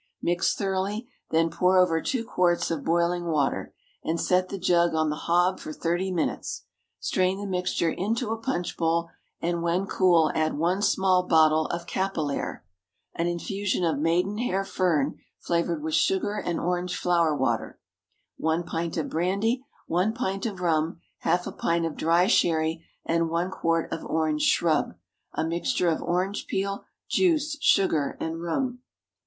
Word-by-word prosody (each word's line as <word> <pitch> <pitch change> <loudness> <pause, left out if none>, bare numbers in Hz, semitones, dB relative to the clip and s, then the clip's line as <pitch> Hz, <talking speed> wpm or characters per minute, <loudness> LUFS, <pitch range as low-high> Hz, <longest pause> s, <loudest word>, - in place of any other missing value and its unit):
Mix 175 0 +1
thoroughly, 200 +3 -2 0.2
then 165 0 +2
pour 185 +1 +3
over 165 -3 +4
two 245 - -2
quarts 175 -4 +1
of 155 -4 -2
boiling 170 +1 +1
water, 150 -4 0 0.3
and 165 +1 -1
set 185 +2 +2
the 200 - -4
jug 175 -2 +2
on 155 -1 +1
the - - -2
hob 175 +2 +3
for - - -7
thirty 175 +4 -1
minutes. 175 -3 -2 0.4
Strain 185 0 +1
the 205 - -5
mixture 180 -3 0
into 220 +6 -1
a 225 - -1
punch 225 -8 -2
bowl, 165 0 +1 0.3
and 170 0 -1
when 170 +3 0
cool 175 -5 +3
add 155 -1 0
one 175 +5 +1
small 190 -3 +3
bottle 155 -1 +4
of 170 0 -4
capillaire 175 - -2 0.5
(an 170 - -1
infusion 185 +2 -2
of 160 -4 0
maidenhair 190 +5 +1
fern, 165 -7 0 0.2
flavoured 170 -2 -1
with 160 0 -3
sugar 190 +5 +2
and 175 -5 -2
orange 180 +1 -1
flower 170 -3 +2
water); 130 -5 -1 0.6
one 160 +2 0
pint 165 -1 -3
of 160 - -1
brandy, 200 +9 0 0.2
one 180 +6 +1
pint 195 -3 -2
of 195 -5 -6
rum, 165 -1 0 0.2
half 180 0 +1
a - - -4
pint 170 0 0
of 165 - -3
dry 170 +2 +3
sherry, 165 -5 +2 0.2
and 165 0 +1
one 170 +3 -1
quart 165 -2 0
of - - -4
orange 155 -1 0
shrub 160 -3 +2 0.4
a 160 - 0
mixture 175 +3 0
of 160 - 0
orange 185 +3 -1
peel, 195 +1 -2 0.2
juice, 310 -5 +2
sugar, 160 -7 +2
and 165 +1 -3
rum. 250 +9 -2
175 Hz, 160 wpm, -26 LUFS, 165-190 Hz, 0.6 s, over